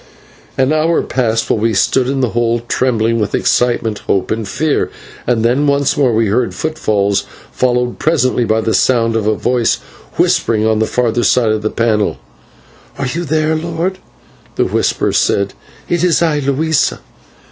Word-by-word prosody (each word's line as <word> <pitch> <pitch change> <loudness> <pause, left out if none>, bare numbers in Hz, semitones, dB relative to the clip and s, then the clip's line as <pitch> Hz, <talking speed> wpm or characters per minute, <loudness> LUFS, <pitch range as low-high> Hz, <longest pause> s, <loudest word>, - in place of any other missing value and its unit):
An 130 +3 +2
hour 160 +2 +1
passed 115 -3 -1
while - - 0
we 110 0 0
stood 125 +6 +2
in 135 0 -1
the 125 - +1
hole 120 0 0
trembling 115 -3 +1
with 105 - -1
excitement, 120 -3 +1
hope, 95 -1 0
and 110 -1 -2
fear, 150 +8 0 0.4
and 115 -2 +1
then 130 +5 +2
once 140 +1 +2
more 140 -5 +2
we 115 0 +2
heard 115 +4 0
footfalls, 105 -10 0 0.3
followed 125 -1 0
presently 130 -6 +1
by 110 -1 +1
the 110 0 -1
sound 115 -3 +2
of 110 -2 0
a 110 - +2
voice 120 +1 +1 0.4
whispering 110 -2 +1
on 110 -1 +2
the 110 - +1
further 120 -1 0
side 115 +1 +3
of 110 0 -1
the 110 - -1
panel. 110 -3 0 0.8
"Are 140 - -2
you 170 +7 -3
there, 155 +1 +1
lord?" 170 +3 -3 0.6
the - - +1
whisper - - 0
said. 100 0 +1 0.3
"It 175 -1 0
is 175 -3 +3
I, 155 -3 +1
Luisa." 145 +2 0
120 Hz, 170 wpm, -15 LUFS, 110-145 Hz, 0.8 s, side